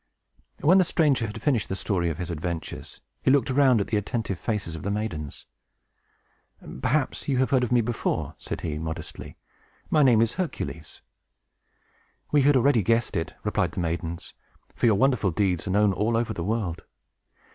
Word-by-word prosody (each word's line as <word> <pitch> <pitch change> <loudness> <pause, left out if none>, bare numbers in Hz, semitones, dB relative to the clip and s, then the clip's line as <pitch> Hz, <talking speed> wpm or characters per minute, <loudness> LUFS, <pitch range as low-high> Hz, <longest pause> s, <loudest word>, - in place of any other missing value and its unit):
When 180 +6 +6
the - - +6
stranger 145 -8 +2
had 110 +2 -7
finished 130 -7 +1
the 95 - -2
story 90 -3 -1
of 80 - -4
his 90 -1 -4
adventures, 85 +1 -5 0.2
he - - +2
looked 135 -2 +3
around 130 -3 +4
at 100 - 0
the 110 - +1
attentive 105 -3 -3
faces 100 -4 -3
of 80 - -7
the 100 - -3
maidens. 100 -9 -4 1.4
"Perhaps 145 +1 0
you 140 - +1
may 130 - +2
have 130 - 0
heard 130 -2 +3
of 125 - -2
me 120 -1 +4
before," 115 +1 -2
said - - -5
he, 75 -2 -3
modestly. 80 0 -7 0.5
"My 155 - +4
name 125 -6 +5
is 115 0 +2
Hercules!" 80 - -5 1.3
"We 145 - +4
had 140 0 +5
already 130 -2 +4
guessed 115 +3 +1
it," 80 - -3
replied - - 0
the - - -4
maidens; 85 0 -4 0.4
"for - - +1
your 110 - +5
wonderful 125 -2 +2
deeds 90 0 0
are - - -1
known 105 +1 +3
all 110 +4 +1
over 115 0 -1
the 85 - -4
world. 100 -4 -2
110 Hz, 180 wpm, -26 LUFS, 85-130 Hz, 1.4 s, When